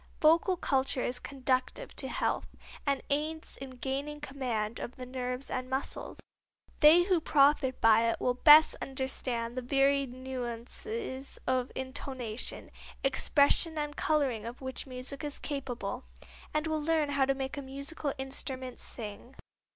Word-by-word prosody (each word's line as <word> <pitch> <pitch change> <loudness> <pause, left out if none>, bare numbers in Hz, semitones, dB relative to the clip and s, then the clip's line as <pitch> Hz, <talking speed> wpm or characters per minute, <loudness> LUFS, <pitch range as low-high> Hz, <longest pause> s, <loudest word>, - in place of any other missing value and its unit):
Vocal 335 +4 +4
culture 265 -4 +1
is 250 0 -1
conducive 260 - -1
to - - -2
health, - - -1 0.4
and 280 -1 +1
aids 310 +2 -2
in 270 0 -7
gaining 280 +4 -3
command 250 -7 -3
of 240 - -6
the 255 - -7
nerves 250 +1 -4
and 255 0 -3
muscles. 265 +1 -3 0.6
They 325 +3 +8
who 365 -2 +2
profit 280 -3 +3
by 225 +1 +5
it - - -1
will 250 - +1
best 300 +4 +8
understand 255 -3 -3
the 255 - -2
varied 275 +1 +2
nuances 260 - -5
of 255 -1 0
intonation, 260 -3 -4 0.3
expression 285 +4 +3
and 295 -1 -2
coloring 270 -9 +1
of 240 +1 -7
which 260 +1 -4
music 255 +2 -3
is 290 -1 -3
capable, 270 -4 -4 0.5
and 305 +1 0
will 315 -1 -1
learn 310 -1 +1
how 280 -1 +2
to 270 0 +1
make 265 0 -4
a 285 - -4
musical 280 +2 -4
instrument 265 -1 -4
sing. 225 +3 -6
270 Hz, 145 wpm, -31 LUFS, 255-295 Hz, 0.6 s, They